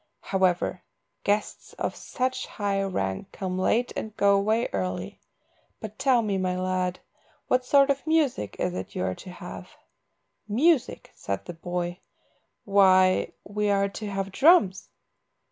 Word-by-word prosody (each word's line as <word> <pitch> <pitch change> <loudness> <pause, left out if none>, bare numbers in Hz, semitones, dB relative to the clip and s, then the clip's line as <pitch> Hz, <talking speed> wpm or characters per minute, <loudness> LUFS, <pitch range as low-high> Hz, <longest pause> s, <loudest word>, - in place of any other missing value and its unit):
However, 185 -1 0 0.4
guests 205 +1 -1
of - - -3
such 255 0 -3
high 200 -2 -1
rank 185 - -3
come 185 -1 -4
late 235 +6 +1
and 220 -1 -5
go 200 0 +4
away 215 +4 +1
early. 95 -1 -3 0.6
But 215 -1 -8
tell 255 -4 +3
me, 200 -3 -1
my 185 -1 -1
lad, 185 0 -1 0.5
what 255 0 +2
sort 280 +1 +5
of 275 +3 -3
music 295 - +1
is 90 - -1
it 95 +1 -6
you - - -1
are 95 0 -1
to 185 - -11
have?" 180 - -9 0.8
"Music," 260 +5 +1
said - - -4
the 175 - -6
boy, 175 +1 -4 0.7
"why, 185 -2 +4
we 210 0 -1
are 200 0 +2
to 210 +2 -6
have 195 -1 -3
drums." 265 - +4
195 Hz, 145 wpm, -26 LUFS, 185-225 Hz, 0.8 s, sort